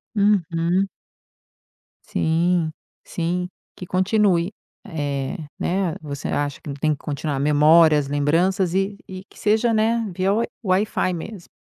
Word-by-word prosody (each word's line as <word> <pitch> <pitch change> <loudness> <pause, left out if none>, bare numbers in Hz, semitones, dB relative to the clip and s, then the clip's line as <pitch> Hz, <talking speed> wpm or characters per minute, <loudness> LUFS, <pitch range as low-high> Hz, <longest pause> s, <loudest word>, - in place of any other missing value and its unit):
Uhum. 185 -2 +2 1.2
Sim, 165 0 +1 0.3
sim. 180 +1 -2 0.3
Que 180 - -8
continue, 190 -1 +2 0.3
eh, 145 -4 -3 0.2
né 185 -2 0
você 145 -2 -5
acha 145 -1 -2
que - - -9
não 140 - -4
tem 155 +2 0
que 145 - -2
continuar 145 -1 -3
memórias, 150 0 +5
lembranças 170 +6 +1
e 195 +1 0
e 185 0 -8
que - - -18
seja, 220 +2 +2
né, 225 +1 +2
via 190 +2 +1
wi 230 +3 +1 0.2
Wi-Fi 185 -1 +1
mesmo. 175 +2 -7
175 Hz, 130 wpm, -22 LUFS, 150-195 Hz, 1.2 s, memórias